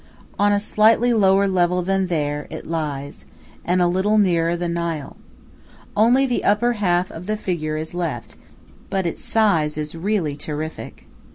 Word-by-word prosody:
On 205 0 +4
a 205 - +3
slightly 225 +3 +3
lower 200 -2 +4
level 180 -1 +1
than 195 +1 0
there 150 -3 -2
it 160 - -8
lies, 150 -4 -4 0.4
and 180 +1 +2
a - - +3
little 190 +5 +1
nearer 170 -4 +2
the 175 0 -2
Nile. 170 -4 -3 0.8
Only 240 +6 +4
the 250 -2 -1
upper 235 +4 +2
half 180 -4 0
of 170 +3 -9
the 215 0 -1
figure 155 -6 -3
is 160 +2 -5
left, 165 -9 -4 0.5
but 190 -2 -1
its 170 - -4
size 165 -9 +1
is 150 0 -4
really 165 -3 -1
terrific. 155 +1 -6
175 Hz, 160 wpm, -21 LUFS, 160-205 Hz, 0.8 s, On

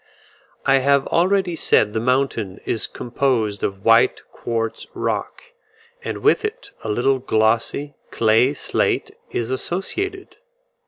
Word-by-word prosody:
I 135 -1 +5
have 140 +1 +3
already 185 0 +2
said 105 -8 +2
the 110 - 0
mountain 120 -5 0
is 110 - 0
composed 120 -4 -1
of 95 0 -3
white - - +4
quartz 115 -1 -3
rock, 485 - -3 0.5
and - - -5
with - - +4
it 440 +4 -5
a 110 - -4
little 130 +5 +1
glossy 115 +4 0 0.2
clay 115 +5 +3
slate - - -1 0.2
is 120 +1 -3
associated. 375 - -3
130 Hz, 120 wpm, -21 LUFS, 110-165 Hz, 0.5 s, I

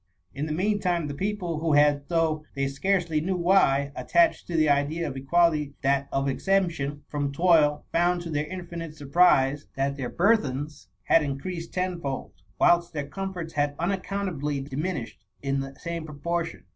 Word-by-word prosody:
In 145 +3 -3
the - - -4
meantime, 180 -1 0
the 145 - -4
people, 180 -1 -2
who 160 -1 +1
had, 145 -1 +3
though 160 -2 +1
they 135 0 0
scarcely 165 +2 0
knew 185 +4 -1
why, 170 -6 +3
attached 170 -1 +2
to 170 - -2
the 155 -1 +4
idea 145 +3 +1
of 135 - -5
equality 150 +1 +2
that 140 0 +2
of 135 0 0
exemption 150 -3 0
from 145 -1 -2
toil, 155 -1 +3
found 175 +1 +2
to 170 - -6
their 150 0 -1
infinite 170 -3 -7
surprise, 145 -2 +3
that 140 +1 -1
their 130 -3 -3
burthens 150 - 0 0.2
had 165 - +4
increased 165 +5 -4
tenfold, 175 -7 -3 0.3
whilst 175 0 +4
their 145 -2 -3
comforts 180 -1 -5
had 145 0 0
unaccountably 180 -5 -2
diminished 135 - -4 0.2
in 135 0 0
the 135 0 -6
same 170 +1 -5
proportion. 165 +3 -3
155 Hz, 160 wpm, -26 LUFS, 140-175 Hz, 0.3 s, the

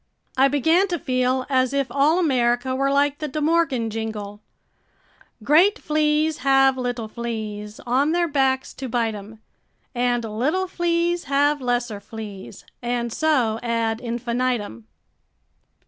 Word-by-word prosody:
I 265 +1 +5
began 320 +8 +3
to 350 -2 -2
feel 255 -1 0
as 260 -1 +1
if 280 -1 +1
all 290 +5 +3
America 255 -5 +1
were 275 +1 +1
like 285 +1 +1
the 305 - -3
De 300 +2 -4
Morgan 300 -7 +1
jingle: 210 -2 -5 1.0
"Great 345 - +4
fleas 305 0 +1
have 270 0 +4
little 245 -3 -3
fleas 215 -2 -6
On 265 +5 +1
their 345 0 +1
backs 265 -3 0
to 265 -2 -6
bite 230 -1 0
'em, 215 +2 -10 0.5
And 245 -1 0
little 270 - -1
fleas 345 -1 0
have 285 +1 +2
lesser 245 -4 -1
fleas 205 -2 -9 0.2
And 240 -1 -2
so 255 -9 +1
ad 230 -1 -1
infinitum." 235 - -2
255 Hz, 130 wpm, -23 LUFS, 230-295 Hz, 1.0 s, I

